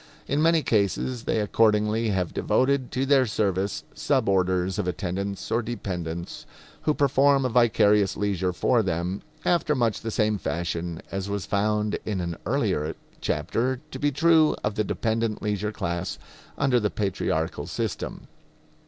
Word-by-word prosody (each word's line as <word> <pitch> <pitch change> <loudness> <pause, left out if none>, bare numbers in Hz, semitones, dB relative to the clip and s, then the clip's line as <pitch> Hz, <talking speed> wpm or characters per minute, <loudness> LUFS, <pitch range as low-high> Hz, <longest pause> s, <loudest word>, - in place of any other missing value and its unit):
In 145 +2 0
many 165 -1 +4
cases 115 +2 0
they - - +1
accordingly 105 +1 +2
have 95 -4 -1
devoted 130 -1 +1
to 130 +2 0
their 135 -2 +4
service 100 -2 -1
sub - - 0
orders 95 -1 +1
of - - -1
attendants 95 +3 -3
or 115 +1 +2
dependents 90 -7 -5 0.4
who 150 - +2
perform 140 -1 +3
a - - +1
vicarious 105 -4 +3
leisure 95 -3 0
for 115 +6 +2
them, 90 0 -2 0.2
after 170 -4 +2
much 115 -5 0
the 115 - -3
same 105 -1 +1
fashion 85 0 -3
as 95 +1 -3
was 100 -1 -2
found 105 +1 0
in 105 -3 -2
an 85 -1 -3
earlier 100 - 0 0.2
chapter 130 +2 -1
to 130 - -6
be 145 +1 +1
true 160 +2 +4
of 105 - 0
the 110 - 0
dependent 110 +1 -1
leisure 105 0 -1
class 85 -2 -3 0.4
under 130 -3 +3
the 105 -2 0
patriarchal 90 -6 -2
system. - - -4
105 Hz, 150 wpm, -25 LUFS, 95-125 Hz, 0.4 s, many